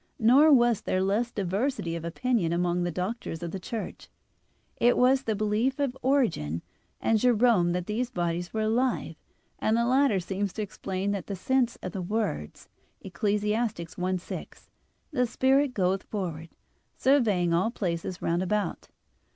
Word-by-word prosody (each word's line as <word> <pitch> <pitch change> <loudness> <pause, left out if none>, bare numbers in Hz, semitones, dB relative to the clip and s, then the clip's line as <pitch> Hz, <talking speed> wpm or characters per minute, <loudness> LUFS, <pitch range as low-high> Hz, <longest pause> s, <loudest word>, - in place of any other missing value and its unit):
Nor 270 +8 +6
was 240 -5 +4
there 185 0 0
less 215 +5 0
diversity 200 -1 -1
of 165 - -5
opinion 180 +1 0
among 175 +1 0
the 175 - 0
Doctors 180 -1 -4
of 170 - -4
the 195 - -4
Church. 220 +4 -6 0.7
It 240 +1 +3
was 260 +2 +4
the 225 -5 -1
belief 215 +5 0
of 280 -3 -1
Origen 265 - +3
(Peri 75 0 -5
Archon 85 +2 -3
i) - - -13
and 225 -1 +4
Jerome 230 -6 +4
that 180 0 -2
these 235 +4 -2
bodies 175 -2 -2
were 220 - -2
alive, 240 +4 0 0.4
and 220 +1 +2
the 235 - +2
latter 255 -4 +3
seems 195 +2 -3
to 215 - -3
explain 195 0 -3
in 195 -3 -3
that 200 +2 -6
sense 255 +4 +1
the 185 +1 -4
words 175 - -3 0.4
(Eccles. 200 +3 -1
1:6), 185 -5 -3 0.4
"The 250 -1 +1
spirit 265 +2 +2
goeth 190 0 +1
forward, 170 -7 -5 0.5
surveying 210 -11 +3
all 180 +6 +2
places 180 -5 -3
round 170 +1 +1
about." 205 +2 -2
205 Hz, 160 wpm, -27 LUFS, 180-240 Hz, 0.7 s, Nor